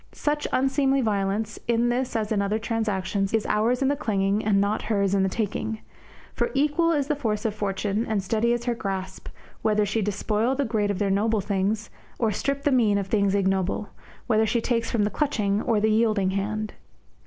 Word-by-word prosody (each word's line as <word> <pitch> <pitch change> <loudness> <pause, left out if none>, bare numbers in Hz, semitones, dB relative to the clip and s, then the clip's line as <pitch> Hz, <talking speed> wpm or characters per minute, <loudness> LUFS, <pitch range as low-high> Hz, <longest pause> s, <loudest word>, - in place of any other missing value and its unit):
Such 295 0 -1
unseemly 270 +1 +2
violence, 205 0 -1
in 235 0 +2
this 245 +1 -1
as 220 -1 -1
in 205 -2 +2
other 200 +2 0
transactions, 205 -3 -1
is 220 - 0
ours 235 +5 +1
in - - +2
the 285 - +2
clinging 200 -4 0
and 205 -2 +3
not 200 +2 +1
hers 200 -3 0
in 195 - +3
the 190 - +2
taking. 220 +1 -2 0.6
For - - 0
equal 300 +4 +2
is 290 -4 +1
the 300 +1 0
force 220 -7 -2
of 220 - +1
Fortune, 205 +1 -2
and 210 -3 0
steady 225 +4 +1
is 240 0 0
her 240 - +1
grasp, 190 -4 -5 0.3
whether 210 -1 +2
she 205 +3 -1
despoil 210 +5 0
the 280 +1 0
great 215 -3 0
of 200 - -1
their 200 -1 0
noble 215 +2 +2
things 205 +2 -1 0.3
or 225 -3 +1
strip 275 +7 -2
the 290 - +2
mean 225 -6 +3
of 200 - -1
things 200 -2 +2
ignoble, 195 +1 0 0.4
whether 220 -2 +2
she 235 - +1
take 230 0 0
from 230 -2 0
the 205 - 0
clutching 215 -9 0
or 225 -3 +1
the 215 +1 +2
yielding 215 -4 +2
hand. 210 +2 -2
215 Hz, 200 wpm, -25 LUFS, 200-235 Hz, 0.6 s, and